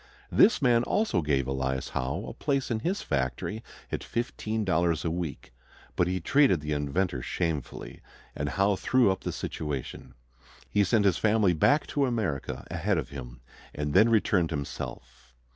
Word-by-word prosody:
This 220 - +5
man 120 -2 +5
also 165 - +1
gave 70 -4 +1
Elias 65 0 -2
Howe 65 +1 -3
a - - -6
place 140 -3 -1
in 110 - 0
his 180 - -2
factory 70 - -2 0.3
at - - -1
$15 95 -8 -1
a - - +1
week. 80 -7 -5 0.4
But 90 - +2
he 90 +1 -1
treated 135 - +4
the 75 0 -5
inventor 75 0 -1
shamefully, 80 -2 -4 0.3
and 70 0 -2
Howe 100 +6 +2
threw 125 +1 +3
up 95 - -3
the - - -3
situation. 75 -5 -5 0.5
He 105 - +2
sent 105 +2 +2
his 95 -4 +3
family 105 -4 +3
back 145 - +3
to 140 -2 0
America 75 - -2
ahead 90 +3 0
of 70 -4 -3
him, - - -9 0.3
and 75 0 -2
then 110 +4 +6
returned 100 -6 +2
himself. 60 -4 -7
85 Hz, 160 wpm, -28 LUFS, 70-110 Hz, 0.5 s, then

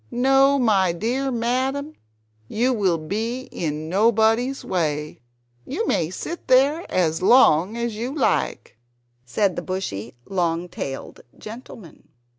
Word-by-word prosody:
No, 270 +2 +4
my 200 -8 +3
dear 245 +9 -1
madam, 260 +5 -1 0.5
you 245 - +1
will 190 -7 +1
be 220 +10 -3
in 155 -1 -3
nobody's 225 +7 +2
way. 150 -7 -2 0.4
You 345 - -3
may 165 - 0
sit 335 - -6
there 275 +6 +3
as 165 -3 +1
long 200 -3 +5
as 235 -2 -2
you 235 +4 -3
like," 265 - -1 0.5
said 190 - 0
the - - -3
bushy 125 - -5
long 175 -2 -1
tailed 135 -4 -6 0.2
gentleman. 215 - -11
220 Hz, 120 wpm, -23 LUFS, 170-255 Hz, 0.5 s, long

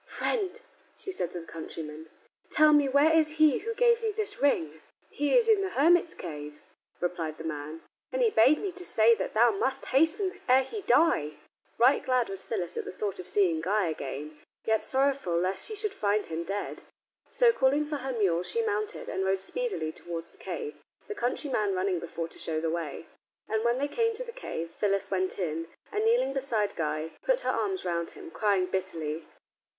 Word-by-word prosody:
"Friend," 425 -1 -2 0.4
she 385 - -5
said 180 - -2
to 175 -1 -6
the - - -12
countryman, 160 -1 -8 0.4
"tell 305 0 +6
me 290 -2 +4
where 285 +4 +4
is 310 -1 +3
he 310 -4 +5
who 460 +2 -4
gave 475 -1 +4
thee 450 - 0
this 420 -6 -4
ring?" 160 - +1 0.3
"He 290 - +2
is 470 -2 +4
in 435 -3 +5
the 390 - -1
hermit's 340 +2 +3
cave," 150 -3 -7 0.4
replied 170 -3 -2
the - - -8
man, 155 0 -5 0.3
"and - - +1
he 455 - +4
bade 265 - +5
me 395 - -3
to 360 +1 -6
say 230 -8 +5
that 225 - -3
thou 235 +2 +6
must 265 +6 -1
hasten 370 +7 +2
ere 260 +1 +6
he 420 - -6
die." 245 - +3 0.4
Right 250 +4 +4
glad 255 -3 +1
was 195 -1 -5
Phyllis 175 -1 -3
at - - -3
the - - -5
thought 195 +1 -4
of 180 - -7
seeing 180 -4 +2
Guy 195 +1 +1
again, 150 0 -6 0.3
yet 220 -1 +2
sorrowful 270 -9 +1
lest 185 +2 -1
she 435 - -6
should 420 -1 -2
find 205 - 0
him 165 +1 -4
dead. 200 +3 -4 0.5
So, 475 -2 +4
calling 280 0 +2
for 295 0 -3
her 265 0 -4
mule, 195 -8 +1
she 460 - -1
mounted 425 0 -2
and 190 - -2
rode 190 0 +1
speedily 195 - -2
towards 170 0 -6
the - - -23
cave, 445 -2 -5 0.3
the 425 - -4
countryman 245 - -1
running 185 -1 0
before 165 0 -5
to - - -11
show 160 -1 -2
the 160 0 -1
way. 165 -2 -4 0.4
And 220 0 0
when 235 +1 +2
they 285 +2 0
came 455 +7 0
to - - -4
the 475 - -8
cave 170 - -5
Phyllis 195 +2 -1
went 185 -1 0
in, 165 -3 -2 0.2
and 420 +1 0
kneeling 460 - +3
beside 240 -7 0
Guy, 155 0 -2
put - - +1
her - - 0
arms 385 -2 -2
round 170 -1 -1
him, 370 -4 -10
crying 200 - +2
bitterly. 165 -4 -3
220 Hz, 200 wpm, -28 LUFS, -, 0.5 s, tell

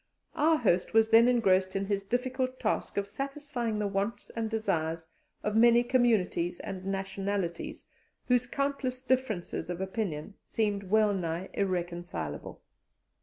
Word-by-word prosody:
Our 320 +1 +3
host 195 - +1
was 225 0 +5
then 230 +1 +8
engrossed 190 -6 +3
in 195 0 0
his 200 0 0
difficult 255 +4 -2
task - - -1
of 200 - +1
satisfying 270 -1 -3
the 210 - 0
wants 200 +3 -2
and 225 -1 -2
desires 165 -7 -1 0.4
of 210 0 -1
many 235 +1 +6
communities 220 -9 +2
and 190 -1 -6
nationalities, 195 -2 -3 0.4
whose 250 -1 +3
countless 275 -1 -2
differences 255 -11 -1
of 175 0 -3
opinion 190 -3 -3
seemed 205 -3 -1
wellnigh 190 -5 +1
irreconcilable. 175 - -3
205 Hz, 125 wpm, -30 LUFS, 185-240 Hz, 0.4 s, then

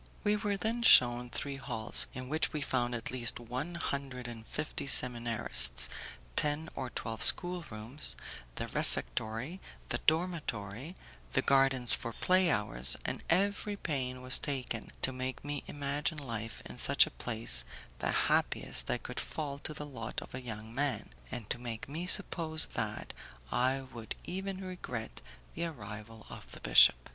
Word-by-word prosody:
We 210 -1 +3
were 205 -1 -1
then 225 +4 -1
shewn 120 - +6
three 140 +3 -4
halls, 120 -5 +1
in 130 0 -6
which 155 +4 +1
we 150 - -2
found 120 -3 0
at 115 -1 -4
least 120 -2 -2
one 130 +8 -5
hundred 135 -6 -4
and 115 -2 -9
fifty 150 -2 -3
seminarists, 115 - +4 0.5
ten 150 +2 0
or 130 - -4
twelve 115 -2 -5
schoolrooms, 150 -7 +2 0.4
the - - -3
refectory, 110 - -3 0.3
the - - +1
dormitory, 155 - -1 0.4
the - - +2
gardens 135 -3 +5
for 115 -2 -2
play 185 +5 +3
hours, 65 - +2
and - - -3
every 200 +4 +1
pain 130 -7 -3
was 130 0 +3
taken 125 -5 -3
to 130 - +1
make 130 +2 -4
me 145 -1 -3
imagine 145 +2 -2
life 115 -5 -5
in - - -8
such - - +5
a - - -9
place 110 - +2 0.4
the - - 0
happiest - - +1
that - - -1
could - - -5
fall 145 -3 -4
to 155 - -3
the 150 0 -6
lot 130 -6 -5
of - - -11
a 125 - -5
young 110 -2 -7
man, 140 +1 -1 0.2
and 120 -5 -6
to 120 - -2
make 115 -2 -6
me 160 +6 -4
suppose 165 -5 +5
that - - -3 0.4
I 130 +2 +1
would 120 -4 -8
even 190 +1 -4
regret 125 -11 -6 0.3
the 170 - -2
arrival 110 -6 -8
of - - -11
the - - -9
bishop. - - +7
130 Hz, 155 wpm, -32 LUFS, 115-155 Hz, 0.5 s, bishop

